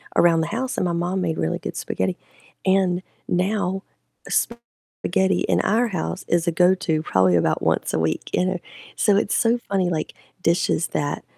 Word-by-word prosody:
around 165 -1 +5
the 160 - -1
house, 250 +7 -3
and - - +1
my 175 - 0
mom 180 +2 -1
made 165 -2 -1
really 80 - -1
good - - -6
spaghetti. 95 -1 -2 0.5
And 185 -1 +2 0.2
now, 190 +1 0 0.5
spaghetti 230 -5 -1
in - - +2
our 230 +3 +2
house 85 - -3
is 175 0 +1
a 170 - +3
go-to 180 -2 +2
probably 95 - +3
about 80 -2 +2
once - - 0
a - - +1
week, 80 0 -1
you 180 - +2
know? 185 -1 -1 0.4
So 205 -2 +3
it's 205 - +1
so 235 +1 +3
funny, 190 -3 +1
like, 160 -3 -2 0.3
dishes 170 -1 +2
that 145 0 -2
180 Hz, 175 wpm, -23 LUFS, 160-195 Hz, 0.5 s, around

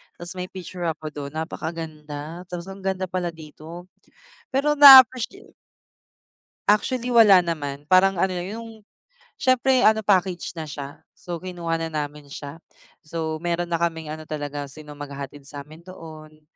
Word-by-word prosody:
tapos 175 0 -7
may 180 - -4
picture 180 -1 -7
ako 155 -1 -4
dun, 140 -1 -7
napakaganda, 160 0 -6
tapos 180 +1 -7
ang 195 - -10
ganda 190 -1 -2
pala 180 -2 -3
dito. 160 +2 -11 0.7
Pero 280 +3 +1
na-appreciate 270 - +7 1.2
Actually 240 +4 +2
wala 220 -6 +7
naman, 145 -4 -5
parang 185 0 +4
ano 190 - +3
lang 180 -1 -4 0.2
yung 230 - -9 0.7
siyempre 255 0 +3
ano 220 0 +4
package 190 -3 +1
na 160 - -4
siya 145 -2 -8 0.2
so 175 -1 -7
kinuha 170 -2 -3
na 165 - -3
namin 150 -2 -5
siya. 145 +2 -9 0.5
So, 160 0 -3
meron 175 +1 -2
na 170 - 0
kaming 160 -2 -2
ano 155 0 -7
talaga 145 -1 -5
sino 150 +2 -12
maghahatid 140 -1 -8
sa 145 0 -8
amin 155 +4 -16
doon, 155 -4 -12
170 Hz, 150 wpm, -23 LUFS, 155-185 Hz, 1.2 s, na-appreciate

